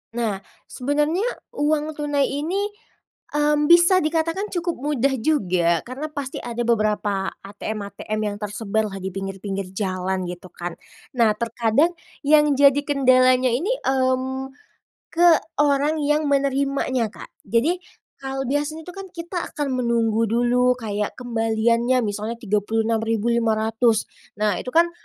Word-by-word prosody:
Nah, 220 -5 -1 0.3
sebenarnya 295 - 0 0.2
uang 300 +1 0
tunai 290 -2 0
ini, 360 +9 -2 0.6
mmm, 295 0 +2
bisa 345 +2 +7
dikatakan 330 +5 -1
cukup 345 -1 -1
mudah 275 -1 +1
juga, 185 - +1
karena 260 +5 -5
pasti 280 -3 -5
ada 240 0 -3
beberapa 210 -4 0
ATM-ATM 205 +1 -5 0.2
yang - - -9
tersebar 215 +1 -2
lah, 195 -1 -7
di 190 - -3
pinggir-pinggir 195 0 -5
jalan, 185 -1 -2
gitu 180 +1 -8
kan. 175 -1 -6 0.4
Nah, 220 -3 +4
terkadang 235 +7 +1 0.3
yang 295 0 +5
jadi 280 0 +5
kendalanya 255 -2 +4
ini, 335 - 0
mmm, 265 0 0 0.5
ke 345 +1 +4 0.3
orang 290 +1 +3
yang 295 +1 +1
menerimanya, 275 -3 +1
Kak. - - -12 0.2
Jadi 280 - +1 0.4
kalau 270 0 -3
biasa 290 +4 -1
itu 360 - -10
kan 390 +1 -8
kita 345 +1 -5 0.2
akan 275 -3 -1
menunggu 230 -1 +1
dulu 245 +2 +3
kayak 210 -3 -3
kembaliannya, 235 +1 +1
misalnya 210 +2 -3
Rp36.500. 225 +1 +1 0.3
Nah, 210 -1 +1
itu - - -8
kan 340 +1 +5
250 Hz, 125 wpm, -23 LUFS, 220-295 Hz, 0.6 s, bisa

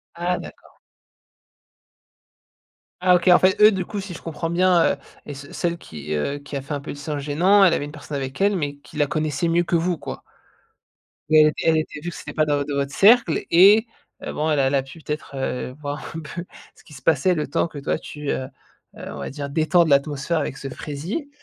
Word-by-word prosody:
Ah! 175 +1 -1
D'accord. - - -12 2.2
Ah 180 0 +4
OK, 175 +1 0
en 175 -1 +8
fait, 190 +2 +2
eux, 210 +1 +9
du 190 -3 -2
coup, 205 - -5
si 190 -3 -7
je - - -10
comprends 165 0 -4
bien, 175 0 +3
heu, - - -7 0.3
et 145 - -6
ce 140 +1 -11
celle 170 -1 -1
qui, 75 - -7
heu, 140 - -2
qui 145 0 -9
a 135 - -3
fait 140 - -6
un 145 - -3
peu - - -7
de - - -8
silence 145 0 -4
gênant, 175 +8 +4
elle 180 -3 +5
avait 145 - -2
une 145 - -9
personne 150 -1 -7
avec 135 +3 -5
elle, 200 +1 +3
mais 145 -5 -3
qui 145 +2 -14
la 145 - +3
connaissait 155 +2 -1
mieux 170 +1 +3
que 175 - -1
vous 170 0 0
quoi? - - -7 1.1
Mais, 155 0 +7
elle 155 0 +4
elle 160 -1 +3
était 155 -1 -3
vu 170 +4 -5
que - - -9
c'était - - -8
pas 155 - +2
dans 145 -1 +1
vot 145 - -1
dans 145 0 -4
votre 140 0 -2
cercle 215 -5 +5
et, 200 +6 +7 0.4
heu, - - -4
bon, 155 +1 -1
elle 150 -2 +2
a 135 - +3
elle 135 - +1
a 135 - +1
pu 135 +5 -13
peut-être, 150 -2 -5
heu 125 -1 -3
voir 145 0 -5
un - - -3
peu 170 +2 -7 0.3
ce - - -21
qui 150 - -15
se 135 - -12
passait 165 +3 +3
le 150 - -2
temps - - 0
que 155 - -11
toi, 140 - -1
tu, 150 -1 -7
heu 130 - -2 0.5
heu - - -8
on - - -8
va - - -5
dire 140 0 -6
détende 160 +3 +3
l'atmosphère 145 +3 +1
avec 140 -2 -3
ce 135 - -6
fraisier. 160 - -5
155 Hz, 240 wpm, -22 LUFS, 145-175 Hz, 2.2 s, eux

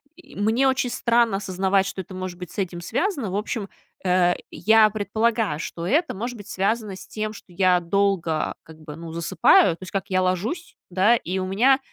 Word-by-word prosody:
и 280 -2 -17
мне 220 +6 +2
очень 265 -2 +1
странно 235 -3 +2
осознавать, 195 0 +1
что 195 -1 -4
это 185 +1 -12
может 185 -1 -5
быть 180 -2 -8
с - - -14
этим 175 -3 -3
связано. 275 - -1
В - - -3
общем, 210 0 -3 0.4
э, 180 -1 +3 0.2
я 220 0 +5
предполагаю, 215 -2 0
что 170 +1 -5
это 320 - +1
может 240 +5 -4
быть 205 - -11
связано 205 +1 -1
с - - -12
тем, 215 0 -4
что - - -13
я 180 0 +3
долго, 175 -3 0
как 160 0 -15
бы, 150 -1 -9
ну, 165 -1 -8
засыпаю. 170 +1 +4
То 185 - -11
есть - - -9
как: 195 -1 -2
я 185 -1 +2
ложусь, 190 - -2
да, 190 +6 +4
и 190 -4 -3
у 185 - -2
меня, 250 +8 +4
195 Hz, 200 wpm, -23 LUFS, 180-225 Hz, 0.4 s, я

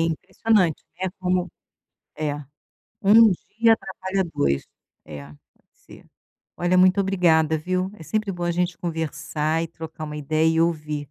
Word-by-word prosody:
impressionante, 170 +2 0 0.2
né, 190 - 0
como 180 -1 0 0.7
é, 150 -2 -2 0.7
1 220 +3 +7 0.3
dia 230 0 +6
atrapalha 190 -1 -3
2, 70 0 +1 0.4
é, 75 -2 -9
pode 75 0 -16 0.4
ser. - - -17 0.5
Olha 175 +1 +1
muito 185 +1 +5
obrigada 165 -5 +2
viu, 185 +4 -2
é 175 - -13
sempre 215 +4 -2
bom 175 -1 -4
a 175 - 0
gente 175 0 -1
conversar 160 -1 -2
e 165 - -4
trocar 160 -1 -8
uma 150 -1 -6
ideia 155 +2 +1
e 160 0 +2
ouvir. 155 -3 0
170 Hz, 145 wpm, -23 LUFS, 155-185 Hz, 0.7 s, 1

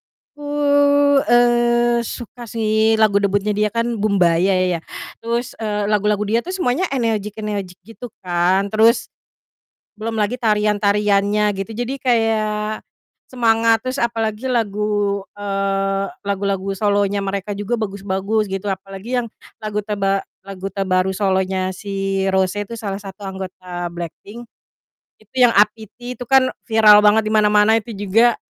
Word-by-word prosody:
Aku, 290 0 -11 0.7
eee, 240 0 +3
suka 240 +1 -8
sih 220 0 +1
lagu 215 -2 +4
debutnya 200 +1 +1
dia 210 0 +2
kan, 230 0 -1
"Boombayah" 185 -2 +2
ya. - - -8 0.4
Terus, 235 +2 -2
eee, 210 -2 -2
lagu-lagu 210 0 +1
dia 230 +3 +1
tuh 365 - -5
semuanya 355 -3 0
energik-energik 210 -5 -3
gitu 225 +1 -11
kan. 180 +2 +1
Terus, 225 +3 +3 0.9
belum 220 +1 -4
lagi 210 +3 0
tarian-tariannya 210 -1 +2
gitu. 195 +2 -5
Jadi 245 +3 -3
kayak 215 -3 0 0.5
semangat 230 -2 +3
terus. 255 +2 -2
Apalagi 225 +1 -2
lagu, 205 -3 0 0.2
eee, 195 -1 -1 0.2
lagu-lagu 195 -1 -1
solonya 200 0 0
mereka 195 +1 -3
juga 205 +4 -2
bagus-bagus 200 0 -2
gitu 195 +1 -4
apalagi 195 +5 -3
yang - - -6 0.4
lagu 210 -1 -3
terba 195 -2 -1 0.2
lagu 195 -1 -8
terbaru 190 -1 0
solonya 190 -1 0
si 195 0 -3
Rose 190 +1 +1
itu 230 - -8
salah 205 -4 -4
satu 195 0 -11
anggota 185 -2 -6
Blackpink 175 +7 -8 0.7
itu 215 -1 -28
yang, 245 - +7
"APT" 220 +4 0
itu - - -4
kan 265 -1 +4 0.2
viral 215 -2 +7
banget 210 +1 +4
di 215 - -2
mana-mana. 210 +1 +4
Itu 220 0 -9
juga 220 +4 +3
210 Hz, 130 wpm, -19 LUFS, 195-225 Hz, 0.9 s, yang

